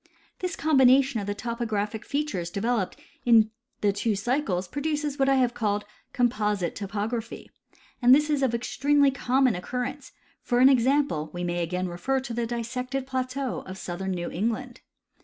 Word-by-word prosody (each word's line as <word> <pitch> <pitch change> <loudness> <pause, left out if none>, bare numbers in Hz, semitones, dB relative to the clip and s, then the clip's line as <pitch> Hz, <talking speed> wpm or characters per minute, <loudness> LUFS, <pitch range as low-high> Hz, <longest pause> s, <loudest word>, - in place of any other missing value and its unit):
The 370 - -1
combina 275 -5 +5
tion 260 -4 -3
of 200 - -6
the 205 - -2
topographic 220 -2 -3
features 280 - -2
developed 205 +1 -1 0.2
in 225 -2 +5 0.3
the 205 -1 +2
two 210 +1 0
cycles 200 -4 -1
produces 295 - -2
what 270 0 +3
I 270 - +4
have 250 -2 +2
called 210 -3 -1 0.2
" - - -43
composite 210 -7 +1
topography," 215 +3 -4 0.5
and 245 - +3
this 300 +1 +2
is 295 -2 +1
of 255 -3 +2
extremely 280 +4 +2
common 260 -1 +2
occurrence 250 +9 -4 0.2
— - - -36
for 245 - 0
an 255 +2 +7
example, 260 - +2
we 175 0 -4
may 175 0 -1 0.2
refer 180 +9 -2
again 265 - 0
to 245 - -5
the 235 0 -1
dissected 250 +3 -3
plateau 260 0 -3
of 185 0 -7
southern 190 +1 -5
New 175 -1 -4
England. 235 +6 -3
240 Hz, 170 wpm, -26 LUFS, 205-270 Hz, 0.5 s, an